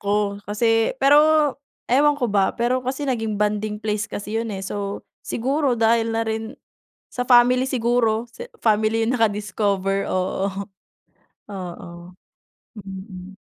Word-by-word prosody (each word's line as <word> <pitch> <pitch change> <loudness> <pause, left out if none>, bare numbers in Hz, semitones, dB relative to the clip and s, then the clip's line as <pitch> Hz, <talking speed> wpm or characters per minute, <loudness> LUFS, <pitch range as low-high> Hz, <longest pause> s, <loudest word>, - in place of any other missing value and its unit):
ko 205 0 -1
kasi 225 +3 +1
pero 295 +2 +5 0.3
ewan 290 +3 +3
ko 260 - -1
ba, 195 -2 +2
pero 245 +2 +1
kasi 260 +3 -3
naging 225 -6 -1
bonding 210 0 -1
place 210 -1 -2
kasi 210 +2 -3
yun, 230 - -4
eh. 195 -2 -5
So, 200 0 -4 0.2
siguro 270 +2 0
dahil 230 0 +2
na 225 - 0
rin 220 +1 -4 0.5
sa 245 - -3
family 250 0 +5
siguro 240 -3 +1
sa 485 - -7 0.2
family 220 0 +2
yung 255 - +1
naka-discover, 200 -3 0
oo, 190 +1 -1 1.0
oo. 175 -2 -8 0.8
Mm. 190 0 -10
220 Hz, 130 wpm, -22 LUFS, 205-245 Hz, 1.0 s, pero